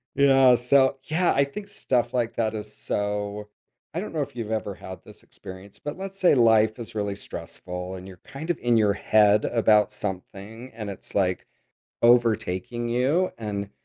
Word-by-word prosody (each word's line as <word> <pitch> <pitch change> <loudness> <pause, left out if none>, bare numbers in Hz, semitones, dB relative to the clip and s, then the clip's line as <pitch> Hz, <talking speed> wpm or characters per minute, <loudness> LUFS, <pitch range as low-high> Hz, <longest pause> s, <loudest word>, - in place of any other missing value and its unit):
Yeah, 135 -2 +6
so, 130 +2 +3
yeah. 170 +4 +1
I 140 - +3
think 200 +9 -8
stuff 125 -11 -1
like 120 -2 -1
that 110 -1 0
is 105 0 -6
so 105 0 -3 0.4
I 170 - -2
don't 205 - -7
know 155 - -1
if 140 -2 -5
you've 110 -2 -5
ever 105 -3 -2
had 95 0 -10
this - - -15
experience, 95 +2 -12
but 145 +2 -6
let's 195 0 -7
say 180 -6 +5
life 110 -2 +4
is 115 -3 -8
really 100 -2 -2
stressful, 90 -2 -7
and 95 0 -9
you're, 95 -2 -12
kind 155 +5 -9
of, 175 - 0
in 120 -1 +2
your 105 -2 +3
head 105 0 +3
about 105 -2 +3
something, 105 +4 -6
and 110 -2 -6
it's, 100 - -8
like, 90 -2 0 0.6
overtaking 120 -1 +2
you, 135 +10 +1
and 100 -2 -4
110 Hz, 180 wpm, -25 LUFS, 100-130 Hz, 0.6 s, Yeah